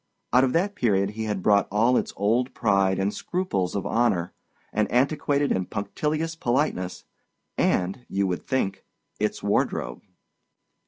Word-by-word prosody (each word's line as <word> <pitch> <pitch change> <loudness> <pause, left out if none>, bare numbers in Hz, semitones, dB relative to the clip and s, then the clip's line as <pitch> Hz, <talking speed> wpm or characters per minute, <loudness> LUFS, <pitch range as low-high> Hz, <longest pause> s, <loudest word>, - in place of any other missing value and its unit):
Out 125 +1 +6
of 130 - +1
that 195 +5 +1
period 100 - +1
he 110 +1 -4
had 105 -4 -2
brought 100 -1 +4
all 115 +5 +3
its - - 0
old 115 +6 +1
pride 100 -3 +2
and 100 +2 0
scruples 175 - -2
of 100 - -2
honor, 95 -8 +1 0.4
an 110 0 +1
antiquated 140 +3 +1
and 95 -1 -1
punctilious 150 +10 -2
politeness, 120 - -1 0.5
and 95 +7 0
(you 100 0 0
would 90 -2 -1
think) 100 -7 -1 0.4
its - - -1
wardrobe. - - 0
110 Hz, 145 wpm, -25 LUFS, 95-130 Hz, 0.5 s, Out